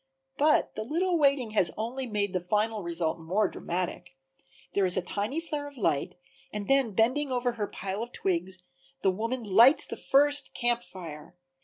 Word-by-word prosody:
But 300 +1 +3
the 215 - -4
little 340 +7 0
waiting 275 -6 +3
has 200 -5 +3
only 245 +4 -3
made 205 -3 -1
the 185 - +1
final 210 +4 0
result 170 -2 -2
more 190 +6 +1
dramatic. 180 -4 -4 0.6
There 195 -2 +3
is 180 - +1
a - - +2
tiny 210 - -2
flare 300 -3 -4
of 285 -1 -12
light, 150 - 0 0.4
and 210 -1 -5
then 270 -7 +2
bending 260 +6 +2
over 245 -1 +1
her 215 -3 -3
pile 195 +2 -5
of 240 +1 -5
twigs 185 -1 -1 0.4
the 190 - +4
woman 230 +6 -3
lights 230 - +6
the - - -6
first 290 +1 +2
Camp 240 -1 +1
Fire. 170 -5 -10
215 Hz, 175 wpm, -28 LUFS, 185-265 Hz, 0.6 s, lights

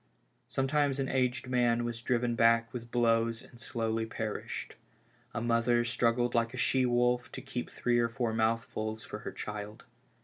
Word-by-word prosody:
Sometimes 140 +1 +1
an 135 - 0
aged 125 -1 0
man 120 -2 +2
was 120 -1 -4
driven 120 -1 +1
back 115 0 +3
with 120 -1 -6
blows 115 -1 +2
and 120 - -16
slowly 115 -1 -1
perished; 110 -1 -4 0.6
a 115 - -3
mother 120 0 +2
struggled 120 +1 +1
like 115 +1 +1
a - - -6
she 130 +1 +2
wolf 125 0 +2
to - - -4
keep 125 -3 -5
three 120 -1 +1
or 115 0 +2
four 115 -1 -1
mouthfuls 110 -1 -1
for - - -6
her - - -6
child. 105 0 -6
120 Hz, 165 wpm, -31 LUFS, 115-125 Hz, 0.6 s, back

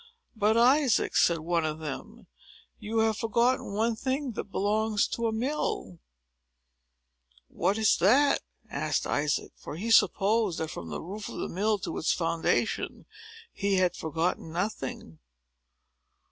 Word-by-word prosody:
"But, 215 +1 +2
Isaac," 255 0 +3
said 170 -2 +3
one 170 0 0
of 155 -1 -2
them, 150 -4 -7 0.5
"you 220 +2 -4
have 220 -1 +1
forgotten 235 +1 +1
one 225 +2 +1
thing 265 +3 -2
that 215 - -5
belongs 210 +1 +1
to 235 -1 -1
a - - 0
mill." 220 - -2 1.5
"What 200 - 0
is 220 -2 +3
that?" 265 +11 +4 0.3
asked 150 -5 -1
Isaac; 145 0 -1
for - - -8
he 220 +8 -3
supposed, 210 -3 +3
that, 160 -1 -3
from 85 - -7
the 75 - -5
roof 200 +5 -6
of - - -8
the - - -3
mill 210 +4 0
to 190 - -5
its 160 - +2
foundation, 165 -1 -1 0.5
he 200 -1 0
had 180 -2 +2
forgotten 160 +1 -2
nothing. 160 - -4
200 Hz, 140 wpm, -28 LUFS, 165-225 Hz, 1.5 s, that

